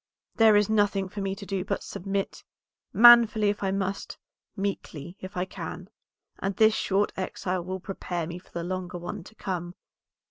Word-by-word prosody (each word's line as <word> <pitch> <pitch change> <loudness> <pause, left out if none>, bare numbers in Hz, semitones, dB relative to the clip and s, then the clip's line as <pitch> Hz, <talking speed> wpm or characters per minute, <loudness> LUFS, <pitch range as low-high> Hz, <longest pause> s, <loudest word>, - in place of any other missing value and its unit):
There 220 -2 +7
is 205 -1 +4
nothing 205 -3 +1
for 200 - -6
me 195 0 -2
to 200 - -9
do 195 -2 -2
but 200 0 -3
submit; 195 +1 -4 0.5
manfully 230 -3 +7
if 205 - -2
I 195 - 0
must, 195 0 -3 0.4
meekly 180 -5 -4
if 185 0 -8
I 180 - 0
can; 185 +1 -8 0.5
and 195 0 -2
this 220 +1 +5
short 205 -1 +1
exile 185 -1 -3
will 185 +1 -4
prepare 180 -3 -4
me 170 +2 -6
for 180 - -24
the 170 - -5
longer 180 0 -4
one 175 +2 -6
to 220 - -15
come. 180 -4 -4
195 Hz, 175 wpm, -27 LUFS, 180-205 Hz, 0.5 s, There